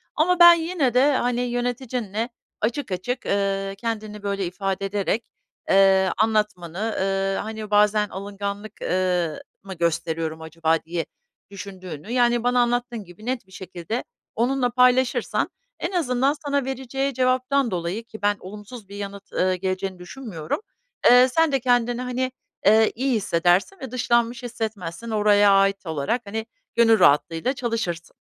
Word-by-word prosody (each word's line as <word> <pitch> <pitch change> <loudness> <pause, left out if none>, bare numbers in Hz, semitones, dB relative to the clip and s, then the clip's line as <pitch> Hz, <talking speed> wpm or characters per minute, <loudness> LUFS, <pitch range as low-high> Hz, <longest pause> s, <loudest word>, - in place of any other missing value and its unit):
ama 360 +3 +2
ben 345 0 +11
yine 330 -6 0
de, 265 +4 +5
hani, 245 -1 0
yöneticinle 245 -2 -2 0.3
açık 235 +2 -2
açık, 245 +8 -3
ııı, 195 -1 -1
kendini, 215 -1 -5
böyle, 200 -1 -1
ifade 195 +2 -3
ederek, 205 +3 -1 0.4
eee, 190 -1 +5
anlatmanı, 210 -2 0
ııı, 195 0 0
hani, 215 -1 -5
"Bazen 210 0 +4
alınganlık, 200 +2 -5
ııı, 180 -3 0 0.2
mı 195 -1 -7
gösteriyorum 165 -2 -2
acaba?" 160 0 0
diye 165 0 -3 0.5
düşündüğünü, 190 -2 -8
yani, 240 -1 +2
bana 245 0 +2
anlattığın 240 -1 0
gibi 180 +4 -14
net 245 -5 -3
bir - - -22
şekilde 185 +5 -5 0.3
onunla 245 +2 +1
paylaşırsan 250 +1 +2 0.3
en - - -2
azından 275 -6 +1
sana 280 -2 0
vereceği 270 +1 -2
cevaptan 255 0 +1
dolayı 180 +5 -3
ki 220 -1 -12
ben 205 0 +2
olumsuz 210 +2 -10
bir 200 - -9
yanıt, 200 0 -7
eee, 185 0 +2
geleceğini 185 0 -3
düşünmüyorum, 180 -5 -5 0.5
eee, 250 +1 +8
sen 325 +4 +2
de 270 - +2
kendini, 245 -1 +1
hani, 255 +1 -2 0.3
eee, 220 +2 +5
iyi 260 +3 0
hissedersin 190 - +1
ve 265 -4 -7
dışlanmış 235 -1 +1
hissetmezsin. 220 -4 -5
Oraya 205 -2 +4
ait 195 0 +3
olarak, 160 - -1
hani, 220 +2 -4 0.3
gönül 225 -2 +5
rahatlığıyla 165 - +3
çalışırsın. 230 -9 -3
215 Hz, 140 wpm, -23 LUFS, 190-245 Hz, 0.5 s, ben